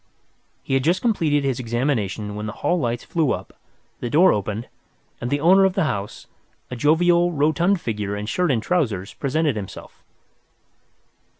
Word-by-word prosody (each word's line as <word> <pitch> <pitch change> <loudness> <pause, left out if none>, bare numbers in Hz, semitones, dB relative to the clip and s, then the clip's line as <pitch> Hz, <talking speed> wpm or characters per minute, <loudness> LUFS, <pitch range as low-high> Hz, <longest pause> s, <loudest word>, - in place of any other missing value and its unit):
He - - -3
had 135 -1 +2
just 175 +5 +1
completed 160 -11 +1
his 135 -3 -1
examination 115 -4 -2
when 105 +1 -5
the - - -3
hall 175 +4 +2
lights 120 -3 -2
flew 160 -5 0
up, - - -7 0.5
the 120 - -4
door 175 +8 +5
opened, 105 +2 -3 0.5
and 120 - -3
the 145 - 0
owner 185 +6 +5
of 190 -1 +3
the - - +1
house, 105 -9 -4 0.5
a - - -3
jovial, 170 +6 +3
rotund 160 +5 +2
figure 105 -6 -3
in 105 - -4
shirt 175 +11 0
and 115 -5 +1
trousers, 110 - -1
presented 150 0 0
himself. 100 -3 -9
140 Hz, 165 wpm, -22 LUFS, 110-170 Hz, 0.5 s, door